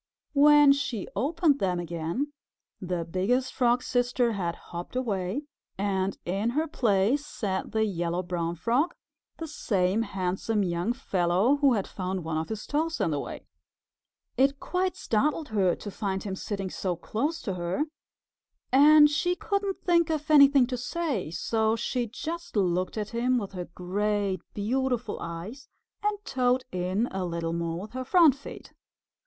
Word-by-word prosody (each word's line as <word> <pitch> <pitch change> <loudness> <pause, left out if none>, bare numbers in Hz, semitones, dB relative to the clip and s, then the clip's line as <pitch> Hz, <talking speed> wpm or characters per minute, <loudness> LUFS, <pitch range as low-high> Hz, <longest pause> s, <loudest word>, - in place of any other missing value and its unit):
When 295 0 +7
she 265 -7 -3
opened 295 - +2
them 180 -2 0
again, 170 - -3 0.5
the 180 -2 -2
Biggest 200 +10 0
Frog's 245 0 +2
Sister 245 -1 +1
had 175 -5 -2
hopped 175 +6 -9
away, 215 0 -1 0.3
and 195 -1 -1
in 195 +6 0
her 320 +1 +1
place 230 +1 +2
sat 195 -9 -3
the 220 0 +2
Yellow 175 -2 -2
Brown 170 -1 -2
Frog, 240 - +1 0.4
the 325 - -5
same 200 -8 0
handsome 195 +1 -1
young 175 +4 0
fellow 195 0 +1
who 280 -3 +4
had 200 -4 0
found 185 -1 -4
one 160 -1 -2
of 160 - -4
his 220 -1 -5
toes 320 +3 -1
in 165 - +1
the 145 - 0
way. - - -7 0.9
It 275 +1 +3
quite 370 0 -1
startled 295 +7 0
her 195 -5 +2
to 205 - -8
find 195 -1 -3
him 195 -2 -4
sitting 195 -1 -4
so 185 -2 -2
close 280 - -2
to 195 - -2
her 175 +9 -1 0.9
and 295 +3 +8
she 350 +5 0
couldn't 400 +2 -2
think 340 -2 +3
of 310 -1 -2
anything 280 -3 +7
to 250 0 -3
say, 250 - -2
so 220 +6 0
she 240 +1 -2
just 330 +9 -6
looked 185 -1 0
at 210 -1 -2
him 245 +2 +1
with 200 -5 -3
her 180 -2 -5
great 195 +2 -1
beautiful 245 +3 -1
eyes 170 +11 -7 0.3
and 420 0 0
toed 255 -1 +1
in 185 +5 0
a 190 -1 -2
little 170 -1 -2
more 170 0 -2
with 210 +3 -8
her 255 +1 -4
front 325 +1 +6
feet. 280 +2 -11
220 Hz, 160 wpm, -27 LUFS, 185-275 Hz, 0.9 s, and